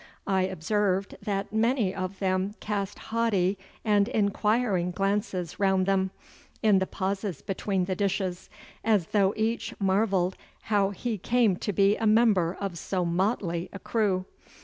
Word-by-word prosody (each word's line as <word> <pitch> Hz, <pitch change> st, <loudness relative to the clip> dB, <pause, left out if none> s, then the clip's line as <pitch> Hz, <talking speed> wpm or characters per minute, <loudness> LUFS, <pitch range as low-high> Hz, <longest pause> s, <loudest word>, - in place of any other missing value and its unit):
I 190 Hz, -2 st, +2 dB
observed 195 Hz, +2 st, 0 dB
that 200 Hz, 0 st, -3 dB
many 225 Hz, -3 st, +2 dB
of 185 Hz, 0 st, -4 dB
them 190 Hz, +1 st, 0 dB
cast 205 Hz, -1 st, -3 dB
haughty 205 Hz, -5 st, 0 dB, 0.3 s
and 205 Hz, -2 st, +3 dB
inquiring 210 Hz, -3 st, +1 dB
glances 195 Hz, -1 st, -2 dB
round 190 Hz, -2 st, +3 dB
them, 190 Hz, -1 st, +2 dB, 0.5 s
in 210 Hz, -3 st, +5 dB
the 190 Hz, -, -1 dB
pauses 195 Hz, -5 st, -3 dB
between 195 Hz, -1 st, -1 dB
the 185 Hz, 0 st, -2 dB
dishes, 190 Hz, -2 st, -2 dB, 0.3 s
as 215 Hz, -6 st, +3 dB
though 200 Hz, -1 st, +2 dB
each 225 Hz, +2 st, -1 dB
marvelled 190 Hz, -2 st, +1 dB, 0.2 s
how 205 Hz, -2 st, +2 dB
he 215 Hz, +2 st, -3 dB
came 235 Hz, -2 st, +2 dB
to 205 Hz, -, -2 dB
be 200 Hz, +2 st, +3 dB
a 225 Hz, -, 0 dB
member 210 Hz, -6 st, +3 dB
of 195 Hz, -4 st, -4 dB
so 185 Hz, +1 st, -1 dB
motley 175 Hz, -1 st, 0 dB
a -, -, -7 dB
crew. 195 Hz, -3 st, 0 dB
195 Hz, 145 wpm, -27 LUFS, 185-210 Hz, 0.5 s, in